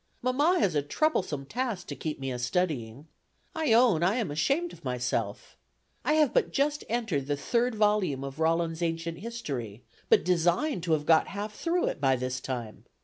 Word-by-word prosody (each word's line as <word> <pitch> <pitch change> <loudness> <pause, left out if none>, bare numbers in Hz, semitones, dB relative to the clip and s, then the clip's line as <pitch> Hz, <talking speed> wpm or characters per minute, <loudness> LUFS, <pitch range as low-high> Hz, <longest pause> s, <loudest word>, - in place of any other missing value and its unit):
Mamma 290 +9 +3
has 190 - +2
a 145 - +2
troublesome 150 - 0
task 235 - -3
to - - -6
keep 155 -4 -4
me 135 -1 -3
a 125 - -4
studying. 135 -3 -2 0.5
I 320 -6 0
own 225 -7 +5
I 185 +5 +3
am 225 -11 -1
ashamed 275 - 0
of 170 - -15
myself. 125 -5 -3 0.5
I 305 - +2
have 305 -4 +3
but - - +2
just 290 +1 0
entered 215 - -1
the 145 -1 0
third 240 - 0
volume 210 -10 +1
of 135 +2 -7
Rollin's 165 +1 +1
Ancient 165 0 -2
History, 140 - -5 0.3
but - - +5
designed 180 - +1
to 165 - +2
have 150 -1 0
got 160 0 +5
half 205 +2 -5
through 340 +9 0
it - - -3
by 135 -2 +4
this 130 0 -3
time. 120 -4 -6
170 Hz, 185 wpm, -28 LUFS, -, 0.5 s, own